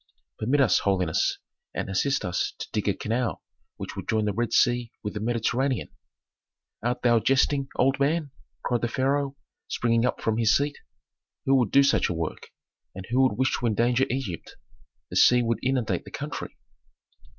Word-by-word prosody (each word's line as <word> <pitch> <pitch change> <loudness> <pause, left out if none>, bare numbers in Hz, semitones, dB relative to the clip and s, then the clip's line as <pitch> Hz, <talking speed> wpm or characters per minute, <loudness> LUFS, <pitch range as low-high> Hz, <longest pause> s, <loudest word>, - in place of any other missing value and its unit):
"Permit 135 +6 +2
us, 130 - +4
holiness, 90 -5 +1 0.4
and - - -2
assist 105 +6 0
us 90 -1 -2
to - - -6
dig - - -2
a - - +2
canal 115 +2 -2 0.3
which - - -7
would - - -7
join 110 -1 +1
the 105 - 0
Red 120 +3 -1
Sea 120 -1 +2
with 105 - -3
the 105 - -4
Mediterranean." 120 +4 0 0.9
"Art 120 +2 -2
thou 120 -2 +5
jesting, 135 +3 +2
old 135 +2 +2
man?" 145 +1 +1 0.3
cried 120 -1 0
the 120 - +1
pharaoh, 135 +3 0 0.3
springing 115 -1 +1
up - - -2
from 110 0 0
his 110 -2 +4
seat. 145 +1 -2 0.7
"Who 135 -1 +4
could 105 - -5
do 140 - +6
such 140 - +2
a - - 0
work, 80 -1 -4 0.5
and 95 0 -7
who 130 +1 +4
could - - -7
wish 130 +1 +2
to 120 - 0
endanger 120 +4 +2
Egypt? 125 - -4 0.6
The - - -1
sea 125 0 +6
would 115 0 0
inundate 120 -8 0
the - - -9
country." - - -6
120 Hz, 175 wpm, -26 LUFS, 110-135 Hz, 0.9 s, do